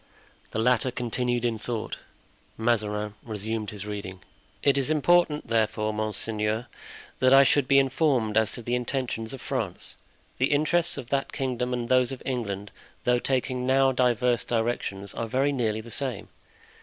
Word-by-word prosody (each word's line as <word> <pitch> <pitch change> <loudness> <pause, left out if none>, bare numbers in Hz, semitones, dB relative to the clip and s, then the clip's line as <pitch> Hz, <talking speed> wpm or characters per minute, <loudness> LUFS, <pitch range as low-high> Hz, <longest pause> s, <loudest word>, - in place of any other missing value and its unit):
The - - -5
latter 125 +2 +3
continued 120 0 -1
in 115 -2 0
thought. 115 0 -4 0.6
Mazarin 105 -2 0
resumed 110 -1 -4
his 105 -1 -7
reading: 100 -3 -6 0.4
"It 140 -2 +4
is 140 0 0
important, 155 0 +3
therefore, 110 -1 +1
monseigneur, 110 +1 -1 0.5
that 130 +1 +6
I 135 - +9
should 135 0 +3
be 140 - +5
informed 135 -5 +2
as 110 -1 +3
to 120 - -7
the 120 - -2
intentions 125 -2 -2
of 135 - -7
France. - - -3 0.4
The 130 +3 +2
interests 160 +3 +2
of 125 -3 -7
that 135 -1 0
kingdom 125 -2 -2
and 120 -1 -2
those 130 0 +3
of 135 - -7
England, 105 -6 -3 0.3
though 125 0 +3
taking 125 -1 -1
now 135 0 +4
diverse 125 -1 +2
directions, 110 -4 -2
are 115 - -3
very 135 +5 +1
nearly 110 -5 0
the 115 +1 -12
same. 130 -6 -3
120 Hz, 155 wpm, -27 LUFS, 110-130 Hz, 0.6 s, I